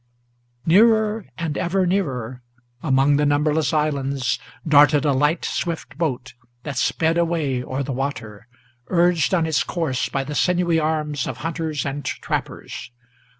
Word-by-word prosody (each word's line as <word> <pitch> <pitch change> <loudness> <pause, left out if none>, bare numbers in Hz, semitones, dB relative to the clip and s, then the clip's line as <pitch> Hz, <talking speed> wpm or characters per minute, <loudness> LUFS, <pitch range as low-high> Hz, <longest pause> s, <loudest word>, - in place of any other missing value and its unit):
Nearer 220 +3 +4
and 165 -4 -3
ever 185 +2 +1
nearer, 130 - -2 0.4
among 140 0 +3
the 150 - +2
numberless 150 +2 +1
islands, 140 -5 0 0.3
Darted 145 -1 +5
a 145 - +3
light, 150 +5 +1
swift 165 -4 -3
boat, 135 -6 -2 0.3
that 140 -4 -3
sped 165 +1 +1
away 155 -7 0
o'er 130 +2 -3
the 140 - -4
water, 115 -6 -5 0.4
Urged 175 -3 +2
on 170 -4 +2
its 160 -2 +1
course 160 -8 -2
by 135 - -1
the 145 +2 -6
sinewy 175 0 +2
arms 150 -3 -1
of 125 - -5
hunters 160 -3 -2
and 140 +1 -3
trappers. 130 - -4
150 Hz, 140 wpm, -22 LUFS, 135-170 Hz, 0.4 s, Darted